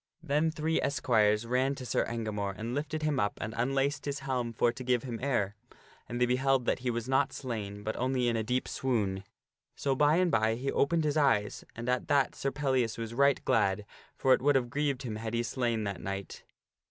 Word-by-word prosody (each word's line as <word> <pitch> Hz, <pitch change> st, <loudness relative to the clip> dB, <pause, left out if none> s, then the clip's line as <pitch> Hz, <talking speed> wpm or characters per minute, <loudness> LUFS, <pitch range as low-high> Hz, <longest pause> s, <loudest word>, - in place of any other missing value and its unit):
Then 150 Hz, +1 st, +2 dB
three 160 Hz, +1 st, 0 dB
esquires 115 Hz, -5 st, +2 dB
ran 130 Hz, +3 st, +1 dB
to 130 Hz, -, -8 dB
Sir -, -, +1 dB
Engamore 105 Hz, -4 st, -3 dB
and 115 Hz, +2 st, -4 dB
lifted 155 Hz, +2 st, -3 dB
him 150 Hz, -3 st, +1 dB
up 100 Hz, -, 0 dB
and 110 Hz, -, -4 dB
unlaced 135 Hz, +4 st, 0 dB
his 140 Hz, -1 st, -3 dB
helm 130 Hz, -3 st, -2 dB
for 120 Hz, +1 st, +2 dB
to 130 Hz, +2 st, -8 dB
give 125 Hz, -2 st, +1 dB
him 120 Hz, -4 st, -5 dB
air. 120 Hz, -8 st, 0 dB, 0.6 s
And 120 Hz, 0 st, -3 dB
they 125 Hz, -, +4 dB
beheld 130 Hz, +1 st, +2 dB
that -, -, +1 dB
he 125 Hz, 0 st, -2 dB
was 120 Hz, 0 st, -2 dB
not 135 Hz, +1 st, +2 dB
slain, 105 Hz, -5 st, -5 dB
but 110 Hz, +1 st, -2 dB
only 130 Hz, 0 st, 0 dB
in 120 Hz, -, +1 dB
a 115 Hz, -, +1 dB
deep 125 Hz, +4 st, -1 dB
swoon. 105 Hz, -7 st, -1 dB, 0.5 s
So 140 Hz, -, 0 dB
by 145 Hz, +3 st, +4 dB
and 180 Hz, -1 st, +2 dB
by 110 Hz, 0 st, +2 dB
he 135 Hz, +4 st, -2 dB
opened 165 Hz, +3 st, +2 dB
his 150 Hz, 0 st, 0 dB
eyes, 115 Hz, -9 st, +2 dB
and 120 Hz, +1 st, -6 dB
at 125 Hz, 0 st, 0 dB
that 140 Hz, -3 st, +3 dB
Sir 135 Hz, -, -2 dB
Pellias 130 Hz, -5 st, 0 dB
was 115 Hz, 0 st, -5 dB
right 140 Hz, +2 st, +3 dB
glad, 100 Hz, +1 st, +2 dB, 0.3 s
for 130 Hz, -, +4 dB
it -, -, +2 dB
would 145 Hz, +1 st, +3 dB
have 120 Hz, -3 st, +1 dB
grieved 140 Hz, -2 st, -1 dB
him 110 Hz, -4 st, -4 dB
had 110 Hz, +1 st, -4 dB
he 120 Hz, -, +1 dB
slain 120 Hz, -1 st, -1 dB
that 100 Hz, -2 st, -4 dB
knight. 95 Hz, 0 st, -6 dB
125 Hz, 215 wpm, -30 LUFS, 115-140 Hz, 0.6 s, they